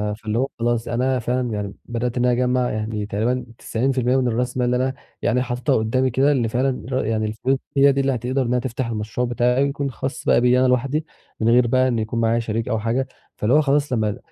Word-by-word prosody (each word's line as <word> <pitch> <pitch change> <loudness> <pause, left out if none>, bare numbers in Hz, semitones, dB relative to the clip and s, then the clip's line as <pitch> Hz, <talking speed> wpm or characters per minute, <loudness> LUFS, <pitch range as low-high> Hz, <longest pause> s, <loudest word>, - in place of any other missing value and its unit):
فاللي 110 +1 -3
هو 135 - +1
خلاص 120 0 0
أنا 125 +2 0
فعلًا 125 +1 -1
يعني 100 -1 -4
بدأت 120 +1 -3
إن 125 - +2
أنا 125 - +3
أجمّع 125 0 +1
يعني 110 -1 -3
تقريبًا 120 +5 -1
90% 125 +1 0
من 125 -1 +1
الراس 125 +2 -1
مال 125 - +1
اللي 125 - +1
أنا 130 +1 0 0.3
يعني 125 +2 +1
حاططها 125 -1 0
قدامي 130 +4 +1
كده 135 +4 +3
اللي 125 -5 +1
فعلًا 125 +3 -1
ر 130 -3 -1
يعني 110 -1 0
الفلوس 110 +5 0 0.2
دي 140 0 +6
اللي 135 -1 +1
هتقدر 125 +3 -1
إنها 125 0 +1
تفتح 125 -1 -3
المشروع 110 +2 -2
بتاعي 125 +2 +2
ويكون 140 0 -2
خاص 130 +2 -5
بقى - - +4
بيّا 125 +1 +4
أنا 130 - +4
لواحدي 135 +5 0 0.3
من 115 +1 +2
غير 120 0 +5
بقى 130 +2 +3
إن 120 -3 0
يكون 110 +2 -2
معايا 115 +1 +2
شريك 115 0 -2
أو 110 - 0
حاجة، 120 +4 -1 0.3
فاللي 110 +4 0
هو 155 - +6
خلاص 145 -1 +1
لما 110 -3 0
125 Hz, 220 wpm, -22 LUFS, 115-130 Hz, 0.3 s, دي